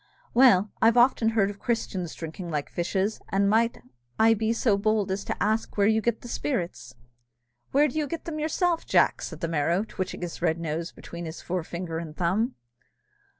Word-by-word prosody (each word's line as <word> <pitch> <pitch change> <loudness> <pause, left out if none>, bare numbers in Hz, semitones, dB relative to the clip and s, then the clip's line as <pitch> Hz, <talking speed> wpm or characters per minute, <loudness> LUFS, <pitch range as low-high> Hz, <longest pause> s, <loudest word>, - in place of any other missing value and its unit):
Well, 225 -6 +5
I've 230 +2 +5
often 240 -2 +4
heard 210 -3 +2
of 200 - -13
Christians 190 -7 -2
drinking 170 +2 -7
like 150 -3 -3
fishes; 190 +4 -1
and 195 +1 +2
might 230 +3 +2 0.4
I 225 +1 +6
be 220 0 0
so 230 -2 +2
bold 205 -1 +1
as 195 +1 -2 0.2
ask 215 +2 0
where 200 - +4
you 220 +1 +3
get 235 0 -1
the - - -9
spirits?" 175 - -3 0.8
"Where 290 +2 +4
do 300 +3 -3
you 300 - -1
get 330 +2 -5
them 310 -2 -4
yourself, 330 +2 0
Jack?" - - +3
said - - -7
the 165 - 0
Merrow, 165 +4 +1
twitching 190 -4 -5
his 175 - -6
red 160 +1 +1
nose 165 +1 -3
between 170 0 -8
his 160 +1 -7
forefinger 175 -1 -3
and 155 -2 -8
thumb. 200 +8 0
200 Hz, 185 wpm, -26 LUFS, 170-230 Hz, 0.8 s, I